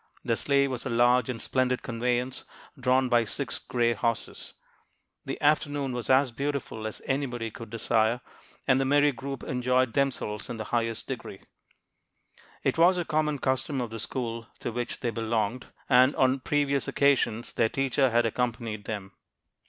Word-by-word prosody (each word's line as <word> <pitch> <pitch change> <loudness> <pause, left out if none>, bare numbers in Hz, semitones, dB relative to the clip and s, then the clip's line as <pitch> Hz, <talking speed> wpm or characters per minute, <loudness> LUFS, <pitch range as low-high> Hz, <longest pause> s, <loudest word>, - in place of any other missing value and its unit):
The 115 - +2
sleigh 140 +3 +2
was 130 -3 -4
a - - -3
large 120 +2 +3
and 120 -3 -3
splendid 130 0 0
conveyance 125 +2 -1 0.3
drawn 130 -1 +2
by 120 -1 +4
six 105 - -3
gray 120 -1 +1
horses. 115 +1 -2 0.7
The - - -4
afternoon 145 -2 +1
was 120 -1 -4
as 130 0 +4
beautiful 140 -4 -3
as 110 - -8
anybody 125 -4 -2
could 115 0 -9
desire, 115 +1 +1 0.5
and 130 0 +4
the - - +1
merry 145 +2 +4
group 135 0 -6
enjoyed 125 -1 +1
themselves 130 -7 -1
in 120 - -4
the 110 - -4
highest 115 -1 0
degree. 115 -7 -6 1.2
It - - 0
was 180 +2 +6
a 175 - -1
common 150 -1 0
custom 130 +1 -1
of 120 -3 -3
the 115 - -5
school 115 0 -4
to - - -3
which 120 0 -3
they 120 - 0
belonged, 115 +1 -1 0.2
and 130 +2 +5
on 130 +1 +3
previous 140 0 0
occasions 130 -5 +2
their 115 -1 +2
teacher 135 +1 +1
had 120 0 +3
accompanied 115 -2 -2
them. 100 -3 -5
125 Hz, 160 wpm, -28 LUFS, 115-135 Hz, 1.2 s, was